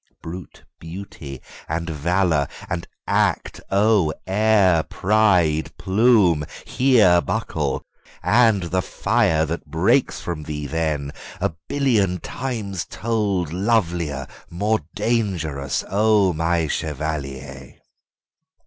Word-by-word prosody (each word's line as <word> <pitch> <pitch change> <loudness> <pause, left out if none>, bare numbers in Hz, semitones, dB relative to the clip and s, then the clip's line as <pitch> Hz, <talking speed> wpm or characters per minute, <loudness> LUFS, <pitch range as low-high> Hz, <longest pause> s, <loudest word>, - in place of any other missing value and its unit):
Brute 85 +1 -9 0.2
beauty 80 -6 -9 0.3
and 80 +2 -2
valour 80 -1 +1 0.2
and 85 -1 -4 0.2
act, - - 0
oh, 100 -4 +3
air, 95 -3 +3
pride, 90 -6 +2
plume, 95 -6 +3 0.2
hereBuckle! 105 - +2 0.4
AND 110 -4 +4
the 90 +2 0
fire 80 -2 +1
that 85 +2 -5
breaks - - +2
from 85 -3 -4
thee 75 -1 -5
then, 75 -2 -2 0.3
a - - -1 0.2
billionTimes 110 -4 -1
told 100 -8 -1
lovelier, 85 - 0 0.2
more 105 +6 0 0.2
dangerous, 80 - -1
O 105 -2 +3
my 80 +1 +1
chevalier! 70 -4 -4
90 Hz, 90 wpm, -22 LUFS, 80-105 Hz, 0.4 s, AND